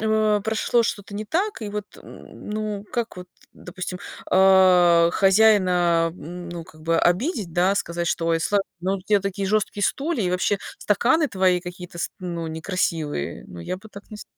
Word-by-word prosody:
э, 215 -1 +2
прошло 220 +2 +1
что-то 200 -2 -4
не 215 +1 -4
так, 365 - -2
и 210 - -4
вот, 210 0 -4 0.2
м, - - -12
ну, 210 -1 -3
как 235 -5 -3
вот, 180 - -8 0.3
допустим, 180 0 -7 0.3
а, 185 -3 +6
хозяина, 185 -5 +4
м, 175 0 -8
ну, 170 -1 -6
как 155 -1 -17
бы 165 +1 +1
обидеть, 195 - 0
да? 185 +3 +2
Сказать, 170 -3 -2
что: 165 -1 -1
"Ой, 165 0 +1
сла 205 +5 +1 0.2
ну, 190 +2 0
у - - -9
тебя 205 0 +2
такие 195 0 -3
жёсткие 210 -1 0
стулья 280 - 0
и 180 - 0
вообще 185 +2 +1 0.2
стаканы 260 +9 +2
твои 185 -2 +2
какие-то 180 -1 -9
ст - - -2
ну, 170 -2 -4
некрасивые". 160 - -3
Ну, 85 - -10
я 135 - -4
бы 220 +3 -14
так 205 +2 -13
не 215 - -8
с - - -9
190 Hz, 185 wpm, -23 LUFS, 175-210 Hz, 0.3 s, а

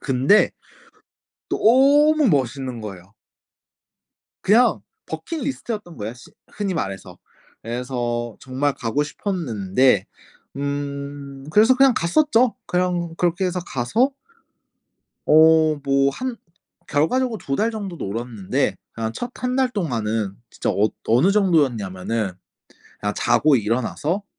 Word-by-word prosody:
근데 135 +10 +3 1.0
너무 285 +4 +4
멋있는 130 - -1
거예요. 95 -2 -9 1.3
그냥 225 +6 +4 0.3
버킷 330 -2 -5
리스트였던 215 - -5
거예요, 110 +1 -5
시 125 - -16 0.2
흔히 200 -3 -2
말해서. 95 - -5 0.4
그래서 120 -1 -3
정말 135 +2 -1
가고 120 +6 -1
싶었는데 125 - 0 0.5
음 140 -1 -5
그래서 220 +9 +5
그냥 270 -1 +5
갔었죠. 245 - +2
그냥 180 -2 -1
그렇게 175 +2 0
해서 180 0 -2
가서 200 - 0 1.1
어 155 0 +6
뭐 140 0 +2
한 255 - -4 0.5
결과적으로 230 - +1
2 135 -6 -3
달 220 +2 +1
정도 200 -6 -6
놀았는데 115 - -2 0.2
그냥 115 0 -3
첫 245 - -5
1 250 0 0
달 260 -1 +3
동안은 115 - -2
진짜 - - -2
어 105 +2 +2 0.2
어느 125 - +4
정도였냐면은 115 - +1 0.7
그냥 105 0 -2
자고 150 -2 +3
일어나서 130 - -1
145 Hz, 240 characters per minute, -22 LUFS, -, 1.3 s, 어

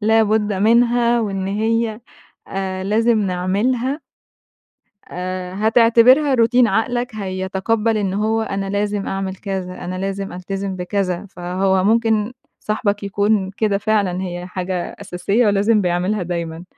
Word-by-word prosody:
لابد 215 -1 +2
منها 235 +3 +3
وإن 195 -3 -2
هي 220 +2 0 0.5
آآ، 190 -1 -3
لازم 225 +3 +2
نعملها 215 - 0 1.1
آآ، 185 0 -5
هتعتبرها 235 +6 +5
روتين، 240 +1 +4
عقلك 240 +1 -1
هيتقبل 200 +3 -1
إن 195 -2 -1
هو 220 +2 +1
أنا 195 -2 -3
لازم 205 0 -1
أعمل 195 0 -3
كذا، 185 -3 -5
أنا 185 +1 -4
لازم 195 0 -3
ألتزم 190 +1 -4
بكذا، 185 +1 -2
فهو 185 +1 0
ممكن 220 0 +2 0.3
صاحبك 210 -1 -1
يكون 200 0 +1
كده 200 0 0
فعلًا، 200 -3 0
هي 175 -1 -5
حاجة 185 -1 -4
أساسية 200 +4 0
ولازم 205 +2 +3
بيعملها 180 +2 0
دايمًا. 170 -1 -4
200 Hz, 120 wpm, -20 LUFS, 185-225 Hz, 1.1 s, هتعتبرها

